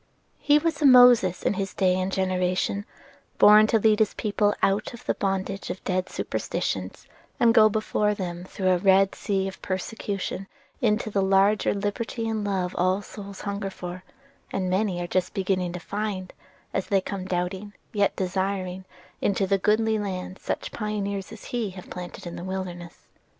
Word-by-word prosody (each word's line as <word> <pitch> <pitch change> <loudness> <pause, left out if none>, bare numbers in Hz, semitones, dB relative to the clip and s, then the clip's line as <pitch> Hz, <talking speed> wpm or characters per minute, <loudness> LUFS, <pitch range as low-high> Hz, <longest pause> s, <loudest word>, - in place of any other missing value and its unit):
He 295 0 +4
was 320 0 -1
a - - +3
Moses 245 -8 +7
in - - +2
his 195 -1 -4
day 185 -2 +3
and 185 +1 -1
generation, 185 +2 0 0.5
born 210 +1 +8
to 225 - +3
lead 215 0 +3
his 220 - +2
people 205 -1 +1
out 200 +4 +1
of 235 - -15
the - - +1
bondage 195 0 -2
of 180 +1 -5
dead 185 0 -1
superstitions, - - -3 0.3
and 235 -1 +5
go 215 -1 +7
before 210 0 0
them 175 -3 -5
through 185 0 -2
a 180 - +3
Red 195 +1 +4
Sea 195 -1 -1
of 190 - -8
persecution 195 0 -4 0.3
into 215 -1 +1
the 200 - +1
larger 195 +2 +3
liberty 220 +3 -3
and 220 -1 -1
love 190 -3 -1
all 185 +3 +2
souls 200 -1 -9
hunger 200 -1 -3
for, 180 -1 -7 0.5
and 185 -1 -2
many 190 -1 0
are 175 - -2
just 180 +2 -1
beginning 185 -2 0
to 180 - -5
find 200 -1 -4 0.4
as 195 - -1
they 195 - +3
come 190 0 -5
doubting, 185 +3 -3 0.2
yet 205 -2 +2
desiring, 190 0 -2 0.4
into 200 0 +1
the 195 +1 +1
goodly 220 +2 +2
land 185 -2 -5
such - - -4
pioneers 200 -3 -3
as 220 - -10
he 235 -4 -1
have 185 -1 -11
planted 180 +2 -7
in 175 - -6
the - - -7
wilderness. 180 -2 -6
195 Hz, 170 wpm, -25 LUFS, 185-210 Hz, 0.5 s, born